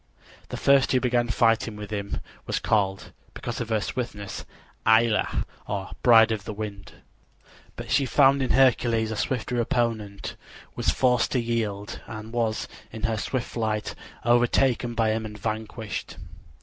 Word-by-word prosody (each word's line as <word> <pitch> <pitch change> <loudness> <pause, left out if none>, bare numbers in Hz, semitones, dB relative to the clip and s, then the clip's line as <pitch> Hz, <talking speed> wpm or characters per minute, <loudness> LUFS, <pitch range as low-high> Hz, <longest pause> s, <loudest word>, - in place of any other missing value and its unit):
The - - -4
first 140 -1 +4
who 130 - +4
began 120 -1 +1
fighting 115 -1 +2
with 105 0 -8
him 100 -1 -3 0.3
was - - 0
called, 100 -3 0 0.2
because 120 0 -4
of 115 - -4
her 110 -1 +2
swiftness, 105 -4 -5 0.4
Aëlla, 110 -1 +3 0.2
or 100 -2 -4
Bride 115 -2 +7
of 110 -2 -2
the 105 - -6
Wind; 100 -2 -6 0.8
but - - -7
she 140 -2 +3
found 135 +1 +5
in 130 - 0
Hercules 115 -4 +3
a - - -2
swifter 125 +1 -1
opponent, 110 -4 -2 0.4
was - - 0
forced 125 -2 +2
to 130 - +2
yield 110 -4 -2
and 110 +1 -8
was 115 -2 0 0.2
in 110 - -8
her 115 -2 +1
swift 125 +2 -2
flight 110 -2 -2 0.3
overtaken 120 0 +3
by 115 -2 +2
him 110 0 -1
and 105 -1 -7
vanquished. 110 +1 -4
115 Hz, 150 wpm, -26 LUFS, 105-120 Hz, 0.8 s, Bride